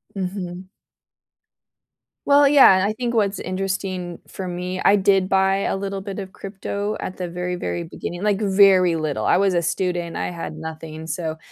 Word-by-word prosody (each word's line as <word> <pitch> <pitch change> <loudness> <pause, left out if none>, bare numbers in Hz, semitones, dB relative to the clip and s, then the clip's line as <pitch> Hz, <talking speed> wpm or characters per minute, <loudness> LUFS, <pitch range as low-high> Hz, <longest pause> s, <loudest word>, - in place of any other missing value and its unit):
Mhm. 185 -1 -5 1.6
Well, 285 0 +6
yeah, 275 -7 +8
and 185 - +2
I 205 +2 0
think 240 +1 -3
what's 205 -3 +1
interesting, 185 -2 -3
for 190 - -6
me, 180 +1 -4
I 200 - +6
did 195 -1 +2
buy 190 0 +3
a 195 - -1
little 195 0 -4
bit 195 0 -6
of 190 -2 -7
crypto 200 +1 -4
at 185 - -6
the 180 - -3
very, 180 +1 -3
very 175 -1 -3
beginning 175 +2 -7
like, 210 -1 +1
very 190 -3 +5
little. 155 -3 -2
I - - +4
was 195 -1 +2
a 175 - +2
student, 175 0 -2
I - - -2
had 165 -2 -6
nothing, 160 0 -7
so, 160 -1 -3
185 Hz, 175 wpm, -22 LUFS, 175-195 Hz, 1.6 s, yeah